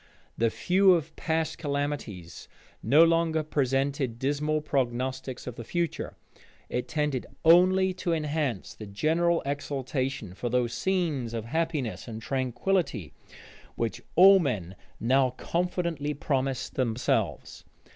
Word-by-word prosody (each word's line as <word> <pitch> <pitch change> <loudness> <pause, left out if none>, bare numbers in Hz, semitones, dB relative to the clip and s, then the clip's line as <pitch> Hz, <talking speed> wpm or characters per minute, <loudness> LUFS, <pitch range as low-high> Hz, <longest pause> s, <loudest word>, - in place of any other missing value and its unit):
The 115 0 +2
view 190 - +4
of 160 -1 -4
past 160 0 -1
calamities 140 - -4 0.3
no 145 +9 +6
longer 165 -1 +2
presented 135 -3 0
dismal 145 +4 0
prognostics 130 -2 -2
of 125 -2 -7
the 115 - -6
future: 170 +6 -3 0.5
it 125 - -2
tended 150 -4 -1 0.2
only 185 +3 +5
to 180 -1 -3
enhance 150 - -1
the 110 - -9
general 165 +11 +1
exultation 135 - -3
for 120 +5 -4
those 120 -1 0
scenes 150 -8 -1
of 110 -1 -4
happiness 155 -4 -2
and 110 -2 -6
tranquillity 130 - -1 0.6
which 115 -2 -2
all 195 +2 +8
men 100 - -2 0.2
now 130 +2 +3
confidently 170 -4 -2
promised 135 -2 -1
themselves. 115 - -1
140 Hz, 115 wpm, -28 LUFS, 120-165 Hz, 0.6 s, all